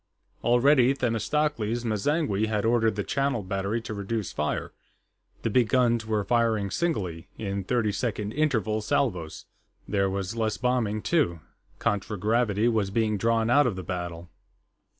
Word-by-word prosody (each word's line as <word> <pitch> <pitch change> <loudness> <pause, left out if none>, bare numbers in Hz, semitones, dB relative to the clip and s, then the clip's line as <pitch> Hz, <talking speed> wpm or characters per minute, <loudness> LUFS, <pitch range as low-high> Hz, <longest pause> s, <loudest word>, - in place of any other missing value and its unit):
Already, 125 +2 +4
Themistocles 120 -1 -1
M'zangwe 110 0 0
had 105 -1 -1
ordered 115 -2 +2
the 105 - -2
Channel 135 -4 -1
Battery 100 +4 -2
to 110 - -6
reduce 105 0 -3
fire; 75 - -2 0.7
the - - +1
big 120 -1 +3
guns 120 -3 +2
were 110 -2 0
firing 110 -2 +1
singly, 95 - -2
in 100 -2 -3
thirty 110 +1 +1
second 105 -1 -2
interval 110 -7 0
salvos. 100 - -1 0.4
There 100 -1 +1
was 95 +2 -3
less 110 -2 -1
bombing, 115 -4 0
too; 130 - +1 0.4
contragravity 105 +2 0
was 110 -4 +1
being 110 0 0
drawn 115 +1 +2
out 145 +3 +5
of - - -1
the 95 - -6
battle. 85 -2 -5
110 Hz, 140 wpm, -27 LUFS, 100-120 Hz, 0.7 s, out